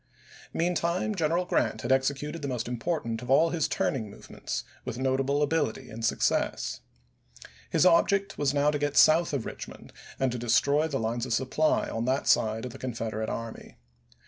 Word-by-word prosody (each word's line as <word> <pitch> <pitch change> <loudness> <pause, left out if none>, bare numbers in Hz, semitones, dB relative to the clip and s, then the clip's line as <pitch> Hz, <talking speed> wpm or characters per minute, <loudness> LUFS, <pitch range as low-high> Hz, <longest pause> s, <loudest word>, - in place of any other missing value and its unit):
Meantime 175 +4 0
General 170 0 0
Grant 110 -9 0
had 120 - -1
executed 140 +4 0
the 140 - -3
most 125 -3 -3
important 120 -2 -2
of 125 - -9
all 160 +5 +4
his 165 -3 0
turning 110 -6 -1
movements 100 - -6 0.2
with - - -5
notable 135 +2 +1
ability 145 -6 -1
and 115 +1 -7
success. 110 - 0 0.9
His - - +3
object 195 +3 +3
was 145 -2 +1
now 145 +1 +2
to 145 - -2
get 145 0 -1
south 165 +2 +6
of 140 -6 -2
Richmond - - -9 0.3
and 130 -1 +1
to 125 - -4
destroy 140 +6 +2
the 140 -4 -2
lines 115 +2 -2
of 120 - -1
supply 145 +4 +1
on 115 +1 -3
that 130 +2 0
side 110 +2 +2
of 125 - -6
the - - -11
Confederate 115 -3 -3
army. 115 -1 -7
135 Hz, 170 wpm, -28 LUFS, 115-155 Hz, 0.9 s, south